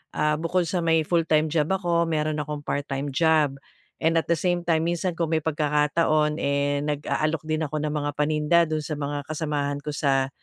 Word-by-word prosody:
ah, 150 0 +2
bukod 175 +2 +1
sa 180 - -1
may 165 -1 +3
full-time 160 -2 +2
job 155 -2 +1
ako, 170 -3 +1
mayro'n 155 -1 -1
akong 150 0 -4
part-time 140 0 -3
job. 155 -3 +3 0.5
And 165 +1 +3
at - - -5
the - - +5
same 175 -1 0
time 165 -1 +2
minsan 175 +1 -1
kung 165 -1 0
may 160 - -1
pagkakataon, 150 0 +1
eh, 140 0 0
nag-aalok 150 +1 -1
din 155 0 0
ako 150 - -6
ng 150 0 -1
mga 145 -1 -1
paninda 150 +2 +2
do'n 155 0 -1
sa 150 +1 -4
mga 145 0 -3
kasamahan 150 -2 -2
ko 150 - -3
sa 135 -2 +1
155 Hz, 190 wpm, -25 LUFS, 145-165 Hz, 0.5 s, the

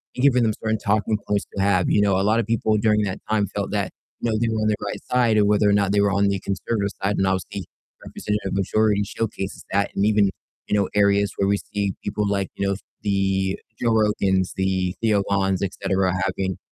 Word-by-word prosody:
and 125 - -3
giving 125 -3 +5
them 110 -1 +2
certain 110 0 +1
talking 105 +1 0
points 105 -1 0
to 100 - -1
have, 95 -2 +2
you - - +3
know, 100 -2 +3
a - - +1
lot 110 +3 +3
of 115 - 0
people 110 -1 +1
during 105 0 +2
that 95 -2 -3
time 105 -1 +2
felt - - -2
that, - - -1 0.3
you 115 - 0
know, 110 - +1
they 120 - +1
were 110 -1 -1
on 110 - +1
the 105 - +2
right - - -4
side 120 -3 +3
or 105 - +5
whether 105 0 +3
or - - +4
not 100 -1 +2
they 100 - +2
were 100 0 +2
on 100 +1 +3
the 100 -1 -1
conservative 100 +2 -2
side, 100 +1 +1
and 95 - +2
obviously, 95 0 -2 0.4
Representative 105 -2 -3
Majority 105 +1 +2
showcases 100 -2 -4
that, 100 +1 +1
and 100 - +2
even, 105 -2 +3 0.4
you 105 - +2
know, 100 - +1
areas 100 0 +3
where 100 - +1
we 100 - +3
see 100 -1 -3
people, 105 0 -1
like, 100 -1 -1
you 100 - -1
know, 100 - 0 0.3
the 95 -1 0 0.2
Joe 120 -1 +2
Rogans, 100 -4 +1
the 95 -1 0
Theo 105 -3 +2
Vons, 95 -2 +1
etcetera, 95 -1 0
having 95 -1 -2
100 Hz, 225 wpm, -23 LUFS, 95-105 Hz, 0.4 s, giving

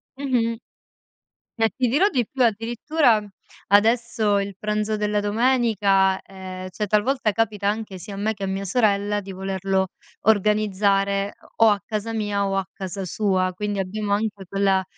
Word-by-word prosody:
Mh-mh. 245 -4 0 1.0
E 225 -1 +3
ti 255 - +1
dirò 295 - +3
di 245 - 0
più, 265 -2 -1
addirittura 230 +2 +2 0.4
adesso 220 0 +3
il 200 -1 -5
pranzo 215 0 -1
della 210 0 0
domenica 205 -4 +2
ehm, 185 -1 -8
cioè 210 +4 -3
talvolta 220 +2 +2
capita 205 -2 0
anche, 210 -3 -3
sia 195 +3 -8
a - - -6
me 215 +2 -1
che 200 - -11
a - - 0
mia 195 +1 -3
sorella, 205 -1 +1
di 195 0 -10
volerlo 190 0 -1 0.4
organizzare 200 -1 +2
o - - -31 0.2
o - - +7
a 205 -1 +1
casa 220 +1 -3
mia 205 -2 -1
o 195 - -1
a 195 - 0
casa 190 0 -5
sua. 185 -1 0
Quindi 205 +1 -3
abbiamo 200 +2 -2
anche 205 -2 -2
quella 195 -1 +2
205 Hz, 160 wpm, -23 LUFS, 195-220 Hz, 1.0 s, o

